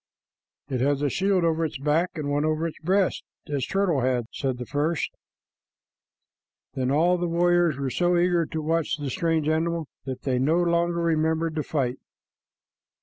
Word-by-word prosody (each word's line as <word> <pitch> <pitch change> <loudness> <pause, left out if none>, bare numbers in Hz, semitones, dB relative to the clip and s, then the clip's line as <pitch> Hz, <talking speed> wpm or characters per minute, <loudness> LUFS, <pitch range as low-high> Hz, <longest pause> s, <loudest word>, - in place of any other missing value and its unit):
"It 130 -3 -2
has 140 +1 +1
a 145 - +2
shield 190 +1 +1
over 165 0 +1
its 155 -2 -2
back 150 +6 +1
and 155 -3 -3
one 145 +1 +1
over 155 +1 0
its 165 - -5
breast, 190 +3 +1 0.2
as 140 -3 -2
Turtle 190 -8 +1
had," 125 -2 +1
said 130 -2 -2
the 125 - -5
first. 150 +5 -1 1.6
Then 130 -1 -1
all 170 +6 +3
the 175 - 0
warriors 175 -2 +2
were 135 -2 -2
so 175 +3 +2
eager 175 -2 +2
to 160 -1 -4
watch 160 -1 0
the 145 -3 -4
strange 165 -1 0
animal 165 +1 0 0.2
that 130 -1 -5
they 130 -2 0
no 150 +6 +2
longer 170 0 +1
remembered 160 0 +1
the 155 - -1
fight. 135 -4 -2
160 Hz, 170 wpm, -25 LUFS, 145-170 Hz, 1.6 s, all